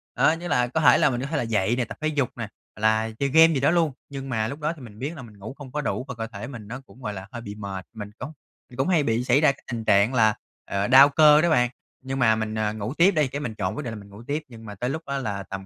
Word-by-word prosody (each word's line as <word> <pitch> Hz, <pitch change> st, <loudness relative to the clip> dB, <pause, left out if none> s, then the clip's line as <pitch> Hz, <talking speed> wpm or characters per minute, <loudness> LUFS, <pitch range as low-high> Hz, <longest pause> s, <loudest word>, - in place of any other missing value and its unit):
Đó -, -, +4 dB
như 170 Hz, +2 st, -4 dB
là 125 Hz, -6 st, +2 dB
có 160 Hz, +6 st, -1 dB
thể -, -, +6 dB
là -, -, +4 dB
mình 125 Hz, -1 st, -2 dB
có 140 Hz, -, -3 dB
thể 155 Hz, -1 st, -2 dB
là 125 Hz, -, 0 dB
dậy 110 Hz, 0 st, +1 dB
nè, 125 Hz, -1 st, -1 dB
tập -, -, -9 dB
thể 155 Hz, -, 0 dB
dục 145 Hz, -5 st, 0 dB
nè, 115 Hz, -2 st, -4 dB, 0.3 s
hoặc 105 Hz, -, -12 dB
là 110 Hz, +1 st, +2 dB
chơi 140 Hz, 0 st, +1 dB
game 160 Hz, +3 st, +6 dB
gì 135 Hz, -, 0 dB
đó 145 Hz, +4 st, +3 dB
luôn, 165 Hz, -4 st, +2 dB, 0.2 s
nhưng 135 Hz, -1 st, -7 dB
mà 110 Hz, -3 st, 0 dB
lúc 140 Hz, +5 st, -6 dB
đó 150 Hz, +2 st, -1 dB
thì 145 Hz, -, -14 dB
mình 110 Hz, -3 st, -12 dB
biết 150 Hz, +5 st, -4 dB
là 135 Hz, -, -8 dB
mình 110 Hz, -4 st, -13 dB
ngủ 110 Hz, +6 st, -8 dB
không 135 Hz, -3 st, -10 dB
có 150 Hz, -, -2 dB
đủ 130 Hz, -, -3 dB
và 125 Hz, -, -6 dB
cơ 115 Hz, 0 st, -4 dB
thể 110 Hz, +2 st, -8 dB
mình 115 Hz, -6 st, -9 dB
nó 125 Hz, +4 st, -7 dB
cũng 130 Hz, -, -18 dB
gọi 105 Hz, -2 st, -4 dB
là 95 Hz, +1 st, -8 dB
hơi 120 Hz, -2 st, -7 dB
bị 105 Hz, -2 st, -8 dB
mệt. 100 Hz, -3 st, -6 dB
Mình 105 Hz, -2 st, -7 dB
cũng 130 Hz, +5 st, -6 dB, 0.5 s
cũng 135 Hz, -, 0 dB
hay 165 Hz, -5 st, +3 dB
bị 115 Hz, 0 st, 0 dB
xảy 130 Hz, +4 st, +3 dB
ra 150 Hz, -, +5 dB
cái 140 Hz, -, -16 dB
tình 115 Hz, -2 st, -4 dB
trạng 100 Hz, +6 st, +4 dB
là, 110 Hz, -3 st, +4 dB, 0.3 s
ờ, 100 Hz, +1 st, -1 dB
đau 135 Hz, +3 st, +8 dB
cơ 150 Hz, +1 st, +6 dB
đó 170 Hz, -, +2 dB
bạn, 125 Hz, -5 st, +3 dB, 0.3 s
nhưng 135 Hz, +1 st, -4 dB
mà 110 Hz, -2 st, +4 dB
mình, 110 Hz, 0 st, -3 dB
ờ, 110 Hz, -1 st, -1 dB
ngủ 110 Hz, +4 st, -4 dB
tiếp 175 Hz, +5 st, +5 dB
đi. 155 Hz, -5 st, +1 dB
Cái 140 Hz, +3 st, -5 dB
mình 110 Hz, -6 st, -4 dB
chọn 95 Hz, -3 st, -2 dB
quyết 150 Hz, -, -4 dB
định 115 Hz, -3 st, -5 dB
là 105 Hz, -, -7 dB
mình 100 Hz, 0 st, -14 dB
ngủ 105 Hz, +4 st, -12 dB
tiếp, 150 Hz, +2 st, -2 dB
nhưng 115 Hz, -2 st, -13 dB
mà 105 Hz, -, -8 dB
tới 125 Hz, +6 st, -3 dB
lúc 160 Hz, +3 st, -3 dB
đó 140 Hz, 0 st, -2 dB
là 100 Hz, -6 st, -3 dB
tầm 95 Hz, 0 st, -7 dB
125 Hz, 330 wpm, -24 LUFS, 110-145 Hz, 0.5 s, đau